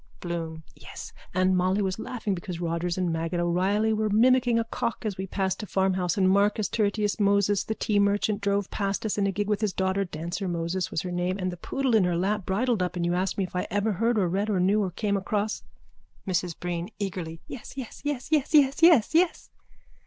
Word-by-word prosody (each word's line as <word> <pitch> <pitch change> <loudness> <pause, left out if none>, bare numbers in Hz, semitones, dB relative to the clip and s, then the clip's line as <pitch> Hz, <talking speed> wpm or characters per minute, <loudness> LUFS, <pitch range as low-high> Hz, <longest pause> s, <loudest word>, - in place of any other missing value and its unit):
BLOOM: 165 -2 -5
Yes. - - -10 0.2
And 185 +1 +2
Molly 185 +2 +2
was 190 +1 -2
laughing 225 -5 -3
because 175 -1 -5
Rogers 170 +1 -2
and 180 -3 0
Maggot 165 +2 -2
O'Reilly 190 +6 +1
were 215 0 0
mimicking 245 +2 +4
a 230 - +2
cock 230 0 -3
as 210 -3 -1
we 190 +1 -5
passed 190 +1 -1
a 210 - -6
farmhouse 190 -2 0
and 190 -1 +3
Marcus 200 +2 +3
Tertius 210 -1 0
Moses, 200 -1 +3
the 220 - -3
tea 210 -2 +1
merchant, 205 +1 +1
drove 200 -1 0
past 200 +1 -2
us 210 -1 -1
in 200 - +2
a - - +1
gig 205 +2 -2
with 210 0 0
his 210 -3 0
daughter, 190 +1 0
Dancer 175 +2 -4
Moses 175 +1 -2
was - - -2
her 180 - -4
name, 180 +1 -1
and 185 -2 -2
the - - -6
poodle 265 +8 -2
in 205 -4 +4
her 175 -1 0
lap 195 +2 -1
bridled 225 +2 +1
up 180 0 -1
and 175 -1 -1
you 175 - +1
asked 185 +1 -1
me 195 - +1
if 180 - -7
I 180 - -1
ever 205 +2 0
heard 230 +4 +1
or 190 -4 +2
read 195 +5 -1
or 200 -3 +1
knew 200 +4 +3
or 195 - 0
came 200 +3 -1
across... 210 +2 -2 0.7
MRS 175 -3 -1
BREEN: 175 +1 -3
(Eagerly.) 175 -5 -4
Yes, 260 +2 -9
yes, 255 -4 -7
yes, 290 -2 -3
yes, 305 0 +2
yes, 280 0 +4
yes, 325 -9 +6
yes. 345 +2 +2
195 Hz, 220 wpm, -26 LUFS, 180-215 Hz, 0.7 s, yes